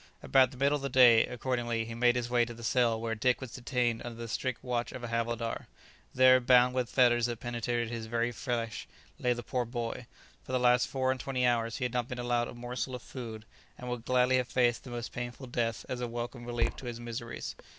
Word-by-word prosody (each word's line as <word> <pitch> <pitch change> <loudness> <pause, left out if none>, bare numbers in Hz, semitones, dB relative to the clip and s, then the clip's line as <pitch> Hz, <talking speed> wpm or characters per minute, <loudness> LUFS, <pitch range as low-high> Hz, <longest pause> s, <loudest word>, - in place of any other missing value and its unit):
About 130 -2 +5
the 130 - -13
middle 140 +2 +3
of - - -9
the 140 - -2
day, 120 -3 +7
accordingly, 120 -2 -2
he 115 - -6
made 120 +1 +3
his 120 -1 -1
way 120 0 +3
to 120 0 -5
the 115 - -11
cell 115 -1 +2
where 115 0 -2
Dick 125 +3 +1
was 130 -3 -7
detained 120 -2 -1
under 120 -1 -7
the 115 0 -6
strict 120 +2 -3
watch 120 -1 -2
of 130 - -8
a 120 - -4
havildar. 115 0 -2 0.5
There, 130 0 +7
bound 125 0 +5
with 125 -2 -1
fetters 120 -2 +4
that 120 -2 -4
penetrated 120 -1 -2
his 115 -1 -5
very 120 +1 0
flesh, 115 -2 -3 0.3
lay 125 -1 +2
the 120 0 -6
poor 125 +2 -1
boy; 120 0 -4 0.4
for 130 - -7
the 130 - +2
last 125 0 +4
four 130 -1 0
and 130 - -3
twenty 130 0 -1
hours 115 0 +1
he 130 - -1
had 125 - -3
not 120 -1 0
been 125 - -5
allowed 120 -1 0
a - - -9
morsel 125 +2 -4
of 125 - -9
food, 110 -4 -8 0.3
and 125 0 -6
would 120 -2 -4
gladly 125 +1 +3
have 125 -1 0
faced 120 -2 +1
the - - -8
most 120 -1 -5
painful 120 +2 -6
death 120 -2 -2
as 125 -1 -4
a 120 - -1
welcome 120 +1 -5
relief 120 -1 -1
to 130 - -8
his 120 -1 -5
miseries. 120 0 -6
120 Hz, 235 wpm, -30 LUFS, 115-125 Hz, 0.5 s, day